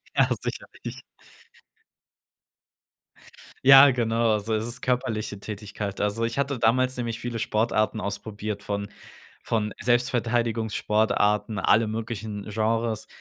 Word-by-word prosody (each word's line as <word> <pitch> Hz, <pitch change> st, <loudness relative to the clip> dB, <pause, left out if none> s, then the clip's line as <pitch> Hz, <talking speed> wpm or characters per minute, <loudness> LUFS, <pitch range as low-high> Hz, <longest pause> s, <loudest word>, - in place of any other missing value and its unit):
Ja, -, -, +4 dB
sicherlich. -, -, -7 dB, 2.7 s
Ja, 135 Hz, +1 st, +10 dB
genau, 115 Hz, -3 st, +1 dB
so 110 Hz, +2 st, -3 dB
ist 110 Hz, 0 st, 0 dB
es 120 Hz, +1 st, -3 dB
körperliche 110 Hz, -5 st, -2 dB
Tätigkeit. 105 Hz, -1 st, -6 dB
Also, 105 Hz, +3 st, -1 dB
ich 115 Hz, +3 st, -2 dB
hatte 140 Hz, -2 st, -1 dB
damals 130 Hz, +3 st, +2 dB
nämlich 115 Hz, -2 st, -3 dB
viele 120 Hz, -1 st, -4 dB
Sportarten 110 Hz, 0 st, 0 dB
ausprobiert, 105 Hz, 0 st, -5 dB
von 100 Hz, -1 st, -4 dB, 0.5 s
von 110 Hz, -2 st, -1 dB
Selbstverteidigungssportarten, 115 Hz, -3 st, +1 dB
alle 110 Hz, +3 st, +3 dB
möglichen 110 Hz, -2 st, -5 dB
Genres, 110 Hz, +1 st, -1 dB
110 Hz, 105 wpm, -25 LUFS, 105-120 Hz, 2.7 s, Ja